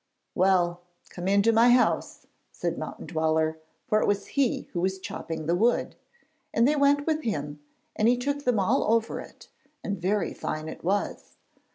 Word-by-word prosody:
"' - - -52
'Well, 175 -2 +2 0.3
come 180 +1 -5
into 200 +3 +4
my 230 +2 +5
house,' 245 +1 +2 0.3
said - - -3
Mountain - - -7
Dweller, 160 -1 0 0.3
for 215 -3 +2
it - - +1
was 200 -1 -1
he 275 -4 +1
who 175 - -1
was 190 +1 0
chopping 160 -4 -6
the 170 - +1
wood, 230 +7 +1 0.6
and 230 +2 +3
they 300 - +3
went 285 0 +3
with 315 -1 0
him 150 - -3 0.4
and 215 - +2
he 245 +1 +4
took 285 +3 -2
them 250 -5 +2
all 225 +8 +2
over 230 0 -1
it, - - -13 0.3
and 200 -4 -4
very 195 +2 0
fine 155 0 -4
it - - -8
was. 200 +4 -2
200 Hz, 180 wpm, -27 LUFS, 175-245 Hz, 0.6 s, my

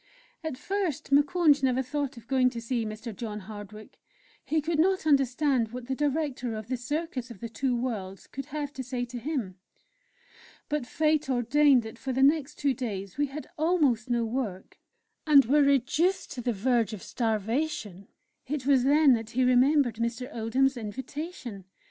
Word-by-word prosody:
At 315 -5 -4
first 345 -6 -3
Moukounj 295 +1 +4
never 260 -1 +2
thought 280 -1 -3
of 230 - -12
going 255 0 +3
to 240 -2 -6
see 230 -1 -2
Mr. 215 +1 -7
John 215 -1 -5
Hardwick. 210 +1 -10 0.4
He 315 - 0
could 310 +1 -1
not 375 +1 +2
understand 275 -3 +2
what 250 0 -7
the 265 - -2
Director 280 -4 -1
of 215 +1 -7
the 260 - 0
"Circus 260 0 -3
of 230 -5 -10
the 230 - -5
Two 245 +3 -1
Worlds" 200 -6 -4
could 275 0 -7
have 295 -1 -4
to 260 - -5
say 250 -1 -3
to 245 0 -7
him. 235 - -4 1.1
But 295 -4 -2
fate 305 -1 +1
ordained 260 +1 +4
that 220 0 -9
for 265 -1 -3
the 265 +2 +2
next 295 0 +3
two 280 -2 +1
days 205 -3 -5
we 290 - +2
had 290 +3 -7
almost 300 -9 +2
no 235 -1 +1
work, 220 -6 -4 0.5
and 285 -3 +7
were 290 +5 +4
reduced 280 +7 +2
to 250 - -5
the 245 - 0
verge 230 +1 +1
of 205 - -7
starvation. 220 - -2 0.4
It 280 -1 -3
was 270 -3 +4
then 285 0 +5
that 225 -2 -2
he 255 +2 +1
remembered 255 -1 +4
Mr. 235 +4 -3
Oldham's 255 +4 +1
invitation. 240 - -6
255 Hz, 175 wpm, -28 LUFS, 230-290 Hz, 1.1 s, and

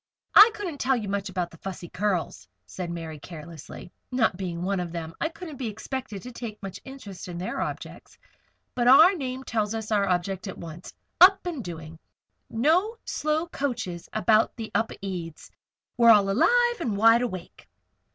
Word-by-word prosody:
"I 420 +3 +10
couldn't 350 -9 -5
tell 265 +1 +2
you 220 -4 -3
much 200 0 -2
about 180 -2 -3
the 165 - -15
Fussy 185 -2 -7
Curls," 180 - -2 0.2
said 175 - -6
Mary, 165 -3 -6
carelessly. 165 +1 -10 0.2
"Not 235 -7 +2
being 175 -2 -4
one 195 0 0
of 175 -2 -4
them 165 -1 -5
I 320 - +1
couldn't 330 -3 -9
be 250 - -3
expected 220 0 -6
to 250 - -8
take 230 -3 -7
much 195 -2 -6
interest 255 -10 -9
in 175 -1 -6
their 180 - -3
objects. - - -6 0.6
But 240 -1 0
our 320 +9 +8
name 260 -6 -4
tells 220 -3 -1 0.2
our 200 -2 +2
object 185 +2 -1
at 190 - -6
once. 170 +1 -9 0.3
'Up 385 +1 +8
and 325 -9 -4
Doing'! 160 -2 -8 0.5
No 345 - +2
slow 310 +2 -1
coaches 240 - -4
about 215 0 +3
the 225 -2 -7
Upedes. 185 -7 -4 0.5
We're 235 -1 +6
all 205 -3 +6
alive 480 - +3
and 225 -11 -2
wide 230 +3 +6
awake." 185 -8 -6
210 Hz, 170 wpm, -26 LUFS, 175-260 Hz, 0.6 s, I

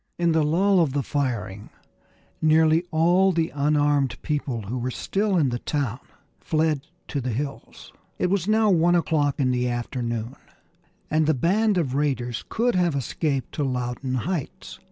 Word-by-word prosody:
In 170 -1 +2
the 160 0 +3
lull 185 +6 +3
of 155 -6 +2
the 140 -1 0
firing 115 -9 -3 0.7
nearly 160 +1 +4
all 175 +4 +3
the 165 -2 0
unarmed 145 -3 +1
people 140 -7 -2
who 120 +6 -4
were 125 +2 -2
still 195 - -1
in 145 -6 +3
the 120 0 -3
town 135 -5 -2 0.4
fled 155 -2 0 0.2
to 140 - -2
the 130 - -3
hills. 140 +4 -6 0.2
It 180 - 0
was 195 -2 0
now 215 -1 +3
one 175 0 +4
o'clock 150 -4 +1
in 130 -2 +2
the 125 0 0
afternoon, 120 0 -3 0.7
and 155 0 +2
the 155 - +3
band 200 - +2
of 145 -7 0
raiders 130 -4 -1
could 240 +2 +1
have 175 -4 +1
escaped 135 0 -2
to 150 - -2
Loudoun 130 0 -2
Heights. 170 -5 -5
145 Hz, 160 wpm, -24 LUFS, 130-170 Hz, 0.7 s, nearly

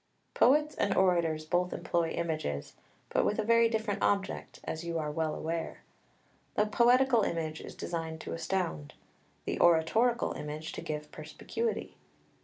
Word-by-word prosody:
] - - -43
2 - - -12
Poets 300 +3 +5
and 200 - +1
orators 170 -4 +2
both 175 +2 +1
employ 170 -1 0
images, 155 - -3 0.4
but - - +2
with 210 - +1
a 215 - +1
very 230 +1 +4
different 220 -2 -1
object, 200 -1 -1
as 160 - -4
you 170 -1 -2
are 150 -2 -2
well 155 0 -1
aware. 165 0 -4 0.7
The 210 - +3
poetical 240 +2 +4
image 160 -4 -2
is - - -9
designed 165 -2 -4
to - - -5
astound; 165 - -2 0.5
the - - -2
oratorical 220 +9 +3
image 150 +1 -5
to - - -6
give 150 0 -5
perspicuity. 200 +8 -4
170 Hz, 155 wpm, -31 LUFS, 160-220 Hz, 0.7 s, Poets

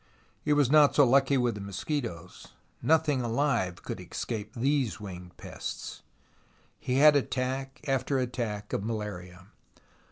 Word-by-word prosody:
He 150 - -1
was 145 -3 +3
not 150 -2 +6
so 145 - +7
lucky 135 +2 +4
with 125 -2 +1
the 105 - -7
mosquitoes. 100 - -5 0.3
Nothing 155 -4 +3
alive 115 -7 0
could - - -5
escape 110 -2 -5
these 130 -1 0
winged 90 -3 -9
pests. - - -7 0.8
He 125 -1 -2
had 150 +2 +7
attack 135 0 -2
after 135 0 +1
attack 120 -5 -3
of - - -1
malaria. 95 -5 -5
125 Hz, 130 wpm, -29 LUFS, 105-140 Hz, 0.8 s, so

